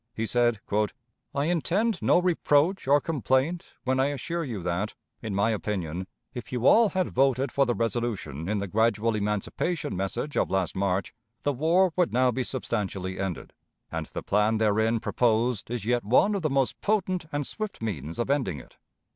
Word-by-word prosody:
He 115 - -1
said: 120 0 +2 0.8
"I 140 +1 +1
intend 175 +6 +1
no - - +4
reproach 175 -1 +2
or 145 +2 +6
complaint 145 +2 0
when 130 0 +1
I 135 - +3
assure 165 +5 -3
you 115 - -5
that, 90 +4 -2 0.3
in 110 -4 -4
my 100 +3 +2
opinion, 95 -5 -3 0.3
if 125 -3 -7
you 125 -1 -2
all 225 +5 +6
had 185 -2 -1
voted 135 +1 +2
for 140 -2 +2
the 120 - +1
resolution 110 - -2
in 105 - 0
the 100 - -2
gradual 110 +2 +2
emancipation 105 - -2
message 120 +10 -3
of - - +1
last 95 -3 0
March, 95 -1 -1 0.3
the 145 - +1
war 165 +6 +3
would 180 -2 +2
now 125 +1 +3
be 130 - -2
substantially 100 -7 -3
ended. 95 -4 -4 0.4
And - - -3
the - - -6
plan 105 +2 +2
therein 110 +1 +2
proposed 115 -1 +1
is 120 -3 -3
yet 120 +1 +1
one 130 - +4
of 200 - -1
the 155 - 0
most 135 -2 0
potent 185 -5 0
and 145 -1 -1
swift 215 +6 -5
means 85 -8 -4
of 120 +3 0
ending 115 - 0
it. - - -16
120 Hz, 180 wpm, -27 LUFS, 105-145 Hz, 0.8 s, or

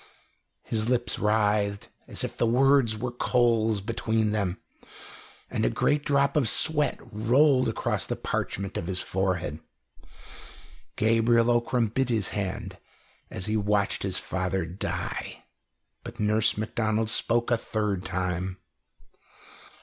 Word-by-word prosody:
His 110 0 -1
lips 120 -2 0
writhed, 105 -1 +1 0.2
as - - -1
if - - -4
the 120 - +1
words 130 -2 +3
were 120 +3 -3
coals 115 -4 +1
between 110 0 -1
them, 100 -4 -2 0.9
and - - -3
a - - +3
great 145 0 +1
drop 140 -1 +2
of 135 -7 +3
sweat 150 -4 +3
rolled 125 +5 +2
across - - -1
the - - -2
parchment 100 0 -3
of 85 - -4
his 90 0 +1
forehead. 90 -5 -2 1.4
Gabriel 115 +2 +3
Ockram 120 -1 +1
bit 130 -1 0
his 110 -5 0
hand 100 -2 -4 0.5
as 95 - -3
he 110 0 -1
watched 105 -1 0
his 95 -2 +1
father 95 -1 -2
die. 85 +4 -5 0.6
But 120 0 -10
Nurse 105 0 +2
Macdonald 110 0 -1
spoke 120 +2 +1
a - - +5
third 105 -4 -2
time. 95 0 -3
110 Hz, 125 wpm, -26 LUFS, 100-120 Hz, 1.4 s, a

